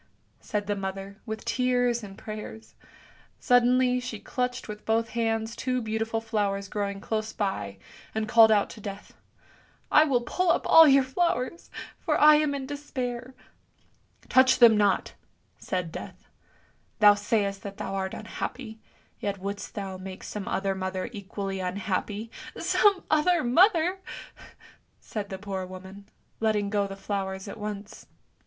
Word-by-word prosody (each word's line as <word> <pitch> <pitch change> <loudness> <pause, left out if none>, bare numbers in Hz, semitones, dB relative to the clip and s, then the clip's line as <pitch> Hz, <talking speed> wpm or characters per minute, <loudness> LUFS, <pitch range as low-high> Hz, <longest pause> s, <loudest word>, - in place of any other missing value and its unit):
said 210 -1 -3
the 205 0 -1
mother, 195 +1 -6
with 220 0 -5
tears 245 -2 +1
and 195 -2 -10
prayers; 215 +1 -8 0.7
suddenly 250 +1 +4
she 245 -4 -6
clutched 250 +2 -3
with 210 -1 -8
both 225 +1 +1
hands 225 -1 -1
two 255 +1 -1
beautiful 225 0 -2
flowers 205 -3 -1
growing 200 -1 -3
close 215 +1 -3
by, 105 - -3 0.4
and 220 0 -1
called 225 -1 +7
out 205 -2 +4
to 215 - -11
Death, 200 0 -8 0.4
" - - -29 0.3
I 305 - +7
will 260 -5 +2
pull 360 +9 0
up - - 0
all 325 -1 +9
your 275 -1 +6
flowers, 265 +1 -1 0.3
for 310 -4 0
I 300 0 +8
am 300 -2 +1
in 270 -1 -4
despair! 260 -3 -5 0.5
" - - -39
"Touch 260 0 +5
them 235 -3 +8
not! 205 -2 +2 0.2
" - - -42
said 180 -3 -3
Death. 185 +6 -9 0.7
'Thou 210 -1 +8
sayst 205 -1 -1
that 200 -1 -8
thou 195 - -4
art 190 -1 -2
unhappy, 220 +1 -6 0.4
yet 200 -1 -2
wouldst 200 +2 -6
thou 195 -3 -5
make 185 0 -8
some 210 -2 -6
other 195 0 0
mother 185 +2 -3
equally 195 -2 -5
unhappy! 200 +3 -3
" - - -10
" - - -15
Some 395 -3 +3
other 315 +2 +3
mother! 350 - +4 0.5
" - - -22 0.3
said 205 -2 -6
the 190 - -5
poor 190 -1 -4
woman, 190 +2 -10 0.3
letting 210 -2 +1
go 205 -1 +1
the 195 - -7
flowers 195 -1 -4
at 200 - -8
once. 210 -1 -7
215 Hz, 160 wpm, -27 LUFS, 200-250 Hz, 0.7 s, all